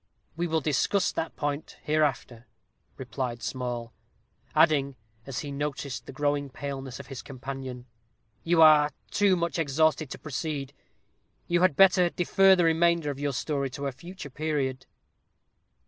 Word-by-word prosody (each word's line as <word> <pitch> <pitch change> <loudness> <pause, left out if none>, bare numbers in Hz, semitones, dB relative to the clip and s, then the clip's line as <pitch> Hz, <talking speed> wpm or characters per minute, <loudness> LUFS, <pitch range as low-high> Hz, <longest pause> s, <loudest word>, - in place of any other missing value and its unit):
"We 175 +1 -1
will 160 -1 0
discuss 150 +7 +1
that 160 - -4
point 145 +1 -4
hereafter," 135 -6 -1 0.5
replied 125 -2 -4
Small; 120 -2 -4 0.6
adding, 140 -4 +3 0.3
as 130 -5 -3
he 145 - -6
noticed 140 -1 -4
the - - -7
growing 145 0 -1
paleness 135 -1 -6
of - - -8
his 135 -3 -8
companion, 130 -2 -7 0.6
"you 165 -1 +5
are 150 -1 +7 0.2
too 200 -2 +3
much 170 -3 -2
exhausted 155 0 +1
to - - -6
proceed 145 -2 -4 0.7
you 175 0 +1
had 185 -6 +4
better 180 -1 +5
defer 190 +2 +4
the 180 - +2
remainder 165 -2 +2
of 140 - -8
your 145 0 -1
story 140 +1 -2
to 140 +2 -6
a 140 - -1
future 160 +3 -10
period." 135 -3 -2
145 Hz, 145 wpm, -27 LUFS, 135-160 Hz, 0.7 s, are